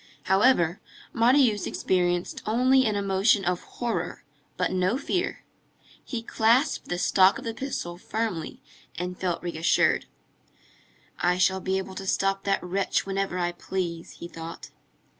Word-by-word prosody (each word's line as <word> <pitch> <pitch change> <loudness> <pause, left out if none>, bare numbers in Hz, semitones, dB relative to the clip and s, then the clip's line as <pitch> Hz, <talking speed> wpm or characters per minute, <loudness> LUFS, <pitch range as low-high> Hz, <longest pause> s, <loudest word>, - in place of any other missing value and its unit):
However, 190 -4 +3 0.3
Marius 240 -2 +3
experienced 175 -1 0
only 255 +3 +4
an 215 - 0
emotion 200 0 +2
of 180 0 0
horror, 240 -2 -4 0.3
but - - 0
no 185 +5 +1
fear. 360 +5 -2 0.6
He 235 -3 -5
clasped 235 +6 +2
the 175 - -1
stock 190 +1 +4
of - - -9
the 230 - -3
pistol 220 -9 -5
firmly 215 -6 -4 0.3
and 180 +1 -4
felt 175 -2 -2
reassured. 165 -1 +2 1.1
"I 180 +1 +2
shall 190 +1 +3
be 190 0 -1
able 190 0 -5
to 195 +1 -7
stop 195 0 0
that 195 -1 +1
wretch 190 +2 0
whenever 195 -1 -2
I 175 -1 0
please," 175 -2 -4
he 170 - -8
thought. 165 0 -9
190 Hz, 140 wpm, -26 LUFS, 180-225 Hz, 1.1 s, only